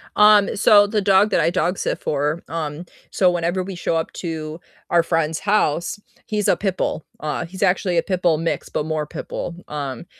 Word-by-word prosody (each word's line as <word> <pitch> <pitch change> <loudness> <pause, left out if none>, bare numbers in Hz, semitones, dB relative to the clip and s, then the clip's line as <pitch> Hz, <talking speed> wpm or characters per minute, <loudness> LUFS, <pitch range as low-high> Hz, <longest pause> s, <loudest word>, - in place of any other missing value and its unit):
Um, 210 -1 +5
so 205 0 +6
the 210 0 0
dog 195 +1 +4
that - - +2
I - - +3
dog-sit 175 +1 -1
for, 150 +3 -1
um, 160 0 -4 0.3
so 180 -2 +3
whenever 175 +2 -1
we 195 0 -7
show 170 -1 -1
up 160 - -1
to 160 -2 -5 0.3
our 170 -1 +4
friend's 165 -2 0
house 195 -3 0 0.3
he's 210 -1 -1
a - - +4
pit 195 -2 -2
bull, 155 - -2 0.2
uh, 155 +3 -3
he's 185 +3 -10
actually 180 -1 +2
a - - +5
pit 185 -2 -2
bull 170 -3 +3
mix, 165 +1 -2
but 150 - -2
more 155 -1 -2
pit - - -8
bull, 170 - -4
um, 140 -1 -5
175 Hz, 200 wpm, -21 LUFS, 155-190 Hz, 0.3 s, so